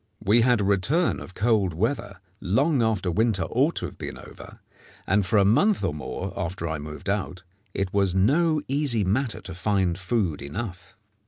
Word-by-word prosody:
We 110 +4 +4
had 120 -2 +3
a - - +1
return 100 - +1
of 90 - -11
cold 105 -5 +1
weather 100 - -2 0.2
long 130 - +2
after 110 -5 0
winter 110 +1 +1
ought 140 +7 +1
to - - -2
have - - -9
been - - -6
over, - - -12 0.5
and 100 +2 +2
for 95 +4 +1
a 100 - +5
month 185 - +3
or 90 -6 0
more 75 +7 -5
after 90 -2 -3
I 80 -1 -3
moved 75 0 -8
out 95 -2 -2 0.3
it 95 -2 -2
was 100 -2 +1
no 150 - +3
easy 135 -6 +1
matter 110 +5 -1
to 95 - -8
find 95 -2 0
food 95 -5 -1
enough. 95 +6 -6
100 Hz, 180 wpm, -25 LUFS, 90-120 Hz, 0.5 s, a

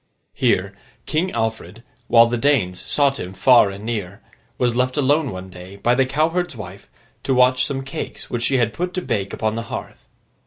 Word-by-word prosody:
Here, 95 +2 +1 0.3
King 165 +4 0
Alfred, 115 -1 -4 0.2
while 115 0 +7
the 120 +1 -1
Danes 115 -9 +1
sought 140 -2 +1
him 90 +1 -6
far 110 +2 +5
and 100 +1 -8
near, 105 -4 -4 0.4
was 120 -2 +1
left 130 +2 0
alone 145 +1 +2
one 95 0 -8
day, 90 +2 -11
by 120 +5 +1
the 130 +1 +2
cowherd's 160 +4 0
wife, 100 -3 -10 0.3
to 135 - 0
watch 125 0 +4
some 135 -1 -3
cakes 135 - -7
which 120 - -3
she 125 0 +3
put 180 +9 -4
to 185 - -2
bake 100 -2 -2
upon 110 -1 -1
the 115 - -3
hearth. - - -7
120 Hz, 185 wpm, -21 LUFS, 100-135 Hz, 0.4 s, while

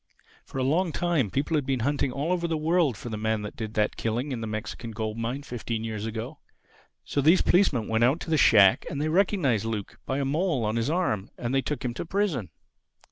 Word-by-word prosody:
For - - -9
a 130 - +1
long 165 +6 +1
time 165 - 0
people 145 - -1
had 145 -3 0
been 130 -3 0
hunting 140 +1 0
all 145 +6 -2
over 175 -1 0
the 165 -1 -1
world 155 - +2
for 120 - -7
the 110 -2 -4
man 110 -1 0
that 105 - -7
did 110 -1 -6
that 105 -1 +1
killing 120 +6 -2
in 120 -3 -3
the 110 - -3
Mexican 110 +2 -5
gold 110 -1 -4
mine 120 +5 -3
fifteen 115 -3 -4
years 110 -1 -4
ago. 115 +6 -5 0.7
So 140 - 0
these 160 +6 +5
policemen 150 - +3
went 110 +1 +1
out 135 +7 +3
to 165 - -5
the - - +4
shack, 105 -9 +6
and 140 - -4
they 155 +1 0
recognized 160 - +2
Luke 110 -3 -4
by 135 - -1
a 140 - 0
mole 150 - 0
on 105 +1 -1
his 115 +3 0
arm. 150 - 0
And 120 +1 -3
they 135 - +3
took 145 -1 -4
him 120 - -1
to - - -4
prison." 170 - -1
130 Hz, 235 wpm, -27 LUFS, 110-155 Hz, 0.7 s, shack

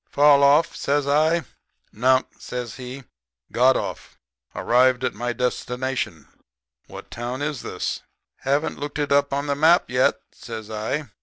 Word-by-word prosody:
"'Fall 145 -1 +5
off?' 145 +4 +4
says 145 0 0
I. 155 +4 +3 0.5
"'Nunk,' 130 +4 +3 0.2
says 125 -2 -6
he. 130 +1 -8 0.5
'Got 130 +2 +4
off. - - -6 0.4
Arrived 125 +1 +3
at - - 0
my 120 0 -3
destination. 125 - -3 0.6
What - - -11
town 125 +4 -4
is 145 -4 -3
this?' - - -4 0.4
"'Haven't 140 +3 -1
looked 145 0 -5
it 145 -1 -2
up 140 0 +3
on 140 +1 -1
the 145 - 0
map 160 +3 +3
yet,' 125 +1 +2
says 110 -2 -8
I. 110 +5 -3
130 Hz, 145 wpm, -23 LUFS, 125-145 Hz, 0.6 s, Fall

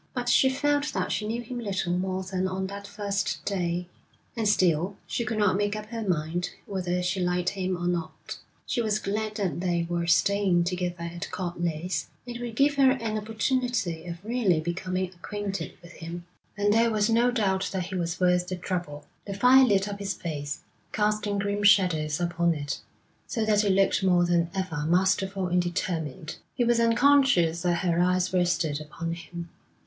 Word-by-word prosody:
But 245 -1 -1
she 265 +2 +5
felt 290 +2 0
that - - -1
she 210 - -1
knew 235 +2 -2
him 245 +1 -6
little 195 -5 -1
more 185 +1 -1
than 185 0 -1
on 190 0 -2
that 200 +1 -7
first 200 -1 -2
day, 180 -3 -1 0.5
and 225 -2 0
still 185 -2 +2
she 235 - -2
could 225 -1 -3
not 205 -3 +3
make 205 +1 0
up 215 0 -7
her 230 -1 -4
mind 175 -2 -1 0.2
whether 180 -2 -2
she 180 +2 -1
liked 180 0 +1
him 185 -2 -2
or 175 - -4
not. 175 -2 -3 0.3
She 245 - 0
was 215 -2 +1
glad 215 +1 -2
that 190 -7 -1
they 175 -2 0
were 170 0 -1
staying 190 0 +3
together 180 -1 -2
at 170 0 -5
Court 175 -2 -4
Leys; 170 +2 -2 0.2
it 240 0 -6
would 235 -2 -5
give 285 +3 +3
her 270 -1 +6
an 230 -4 -3
opportunity 220 -5 -1
of 170 +3 -7
really 220 -8 +2
becoming 185 +3 -2
acquainted 200 +2 -5
with 170 - -12
him, 170 +1 -8 0.3
and 205 0 +3
there 230 +1 +4
was 215 -2 +2
no 235 +2 +3
doubt 195 -6 0
that 185 -2 -2
he 190 - -8
was 170 -1 -2
worth 180 -1 +3
the 185 - -3
trouble. 175 -5 -4 0.2
The 200 - -4
fire 255 +5 +7
lit 200 -4 +2
up 200 0 -5
his 200 -2 -2
face, 145 -4 -5 0.3
casting 210 -1 0
grim 205 +1 -1
shadows 180 -7 +4
upon 170 -1 +1
it, 145 -1 -4 0.5
so 225 -2 -1
that 210 -1 +3
it 205 - +1
looked 195 +1 +3
more 180 -2 +4
than 170 -1 +2
ever 180 -6 -2
masterful 190 +2 +2
and 180 0 +2
determined. 160 -4 -3 0.2
He 250 - +1
was 235 0 +3
unconscious 230 - +4
that 175 +1 0
her 170 -1 +2
eyes 180 +1 +1
rested 170 -4 +1
upon 165 +2 -5
him. 170 0 -8
185 Hz, 185 wpm, -27 LUFS, 175-210 Hz, 0.5 s, fire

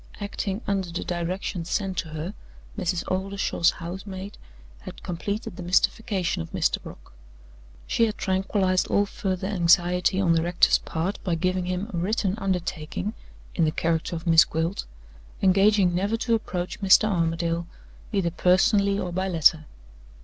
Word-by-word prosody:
Acting 200 0 -3
under 195 -3 -1
the 170 - -4
directions 175 0 -3
sent 195 -2 -1
to - - -3
her, 160 +5 -5 0.4
Mrs. 180 -3 -1
Oldershaw's 190 -2 +1
house 175 +3 -6
maid 195 +1 -7 0.4
had - - -11
completed 200 +4 -4
the - - -6
mystification 180 - +1
of 80 - -7
Mr. - - +1
Brock. - - -13 0.7
She 230 - +2
had 215 - -4
tranquilized 190 -1 +1
all 205 - +2
further 190 -3 -3
anxiety 180 0 +3
on 175 -4 +3
the 165 - +2
rector's 175 +1 +3
part 170 +5 -3
by 175 -4 0
giving 185 +2 0
him 185 +3 -2
a - - -2
written 190 +2 0
undertaking 180 0 -3 0.4
(in 170 - +1
the 155 - +2
character 165 +2 -1
of 165 +1 -6
Miss 165 -2 +7
Gwilt), 165 +4 -2 0.6
engaging 195 -1 +4
never 200 +5 0
to 230 0 0
approach 185 -4 -3
Mr. 195 +2 +6
Armadale, 170 -2 0 0.4
either 190 -5 0
personally 200 +3 +3
or 180 -3 -3
by 185 +2 -1
letter! 160 -3 +3
185 Hz, 150 wpm, -25 LUFS, 170-195 Hz, 0.7 s, Miss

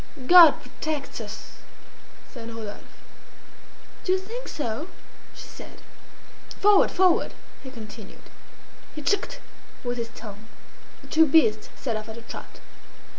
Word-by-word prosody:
"God 345 -1 +9
protects 285 +3 -5
us!" - - -9 0.8
said 230 -2 -8
Rodolphe. 220 -3 -8 1.2
"Do 370 - +2
you - - +3
think 450 +7 -7
so?" 285 +2 -4 0.5
she - - -10
said. - - -12 0.8
"Forward! 410 -1 +6
forward!" 370 -2 +2 0.3
he 265 - -9
continued. 220 -4 -11 0.7
He 300 - -6
"tchk'd" 405 - 0 0.5
with 245 -1 -3
his 230 0 -3
tongue. 210 0 -10 0.6
The - - -13
two 320 0 +5
beasts 225 -8 +4
set 235 -5 -3
off 215 +1 -5
at 220 - -8
a 230 - -10
trot. - - -10
260 Hz, 125 wpm, -25 LUFS, 225-345 Hz, 1.2 s, God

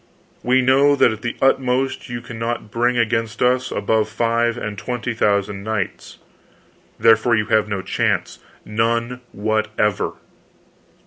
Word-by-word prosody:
We 130 +1 +2
know 140 +3 +4
that 125 - +4
at 110 0 -7
the 120 - -3
utmost 130 0 +1
you 120 -1 -5
cannot 115 -2 -5
bring 120 +2 +1
against 115 -1 0
us 125 +1 +2
above 110 +1 0
five 115 +1 0
and 110 -3 -5
twenty 120 +3 -4
thousand 100 -2 0
knights. 110 -3 -4 0.8
Therefore, 115 +1 +4
you 105 -1 0
have 110 -1 +3
no 100 -3 -3
chance—none 115 +6 -2
whatever. 105 -1 -1
115 Hz, 125 wpm, -20 LUFS, 110-125 Hz, 0.8 s, know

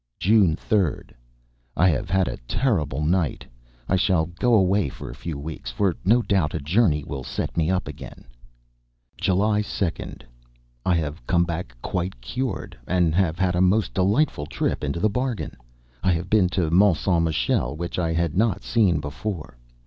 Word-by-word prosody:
June 95 -3 +4
3d. 95 -3 -1 0.7
I 90 - +5
have 80 - -1
had 95 0 +2
a - - -3
terrible 75 - 0
night. 85 -2 0 0.4
I 95 - +2
shall 90 -4 +2
go 100 +8 +1
away 95 -4 +3
for - - -8
a - - -8
few 85 -4 -6
weeks, 75 -4 -6
for 85 +8 0
no 115 +6 +4
doubt 95 -9 +1
a - - -1
journey 75 0 +2
will 70 -2 -6
set - - -4
me 80 -1 +1
up 95 0 0
again. - - -9 0.9
July 105 +3 +1
2d. 100 -4 -4 0.6
I 90 - +2
have 75 -5 -3
come 85 -1 +3
back, 85 -7 -4
quite 90 -6 -3
cured, 120 - -4
and 90 -2 +2
have 85 -2 +1
had 90 -1 +1
a 90 - +2
most 100 +4 +2
delightful 95 - +1
trip - - -2
into 75 +3 -2
the 110 - +3
bargain. 125 +1 -2 0.5
I 95 - +2
have 85 +2 -4
been 105 -4 +4
to 90 -4 0
Mont 95 -1 +5
Saint 85 -1 +1
Michel, 75 -4 0
which 85 +3 -4
I 85 -2 0
had 80 -1 0
not 100 -1 +1
seen 95 -10 +2
before. 75 - -5
90 Hz, 170 wpm, -24 LUFS, 80-100 Hz, 0.9 s, I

